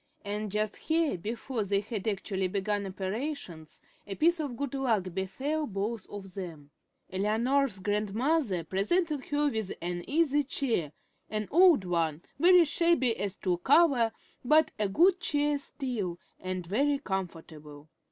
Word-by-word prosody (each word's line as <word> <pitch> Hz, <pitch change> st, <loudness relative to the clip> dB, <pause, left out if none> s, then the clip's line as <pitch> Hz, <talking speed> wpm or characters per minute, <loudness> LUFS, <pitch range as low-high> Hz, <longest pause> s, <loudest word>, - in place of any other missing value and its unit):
And 210 Hz, 0 st, -3 dB
just 210 Hz, 0 st, -1 dB
here, 320 Hz, -4 st, +1 dB
before 225 Hz, +5 st, -3 dB
they 200 Hz, 0 st, +1 dB
had 210 Hz, -1 st, -5 dB
actually 195 Hz, -2 st, -1 dB
begun 200 Hz, +1 st, -1 dB
operations, 190 Hz, -, -5 dB, 0.2 s
a 195 Hz, -, -4 dB
piece 335 Hz, -, +3 dB
of 280 Hz, -6 st, -3 dB
good 280 Hz, -2 st, -3 dB
luck 220 Hz, -10 st, 0 dB
befell 265 Hz, -, -2 dB
both 205 Hz, +1 st, -3 dB
of 195 Hz, -2 st, -8 dB
them. 165 Hz, -7 st, -8 dB, 0.4 s
Eleanor's 225 Hz, +5 st, +1 dB
grandmother 210 Hz, -, 0 dB
presented 280 Hz, -, 0 dB
her 295 Hz, 0 st, +1 dB
with 220 Hz, -4 st, -2 dB
an 175 Hz, 0 st, -4 dB
easy 295 Hz, -1 st, +3 dB
chair, 240 Hz, -, -1 dB, 0.4 s
an 215 Hz, -1 st, -2 dB
old 340 Hz, -, +6 dB
one, 165 Hz, -2 st, -1 dB, 0.2 s
very 355 Hz, +1 st, +7 dB
shabby 335 Hz, -, +2 dB
as 205 Hz, 0 st, -3 dB
to 180 Hz, -3 st, -1 dB
cover, 265 Hz, -, +4 dB, 0.3 s
but 305 Hz, +5 st, +4 dB
a 210 Hz, -2 st, +1 dB
good 355 Hz, -, +4 dB
chair 295 Hz, -3 st, +1 dB
still, 235 Hz, -, -4 dB, 0.2 s
and 185 Hz, -1 st, -4 dB
very 280 Hz, +11 st, +1 dB
comfortable. 160 Hz, -, -6 dB
215 Hz, 140 wpm, -29 LUFS, 190-285 Hz, 0.4 s, very